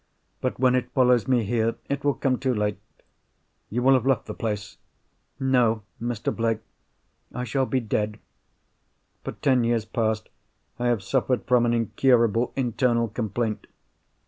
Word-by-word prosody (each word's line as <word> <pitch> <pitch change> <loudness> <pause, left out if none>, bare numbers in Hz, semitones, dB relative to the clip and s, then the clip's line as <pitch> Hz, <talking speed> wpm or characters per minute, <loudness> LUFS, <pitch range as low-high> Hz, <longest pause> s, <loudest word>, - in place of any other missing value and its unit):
But - - -1
when 130 -1 +4
it 125 -1 0
follows 125 -2 +3
me 125 -3 +3
here, 115 +1 0
it 140 0 -2
will 145 -1 +2
come 130 -2 0
too 130 -2 0
late." 105 -1 -1 0.9
"You 120 +3 -1
will 135 +1 +6
have 130 0 +2
left 135 -5 +2
the - - -6
place?" 105 -2 -4 0.6
"No, 125 -5 +2 0.2
Mr. 120 -2 -2
Blake—I 115 +2 -6
shall 130 +2 0
be 130 - +1
dead. 105 -1 -1 1.1
For - - -5
ten 130 -3 +2
years 115 -2 +1
past 110 -1 -1 0.5
I 120 - 0
have 120 -5 +1
suffered 130 +3 0
from 125 -1 +3
an 120 - +2
incurable 115 0 +2
internal 120 -2 +1
complaint. 110 0 -3
120 Hz, 145 wpm, -25 LUFS, 110-130 Hz, 1.1 s, will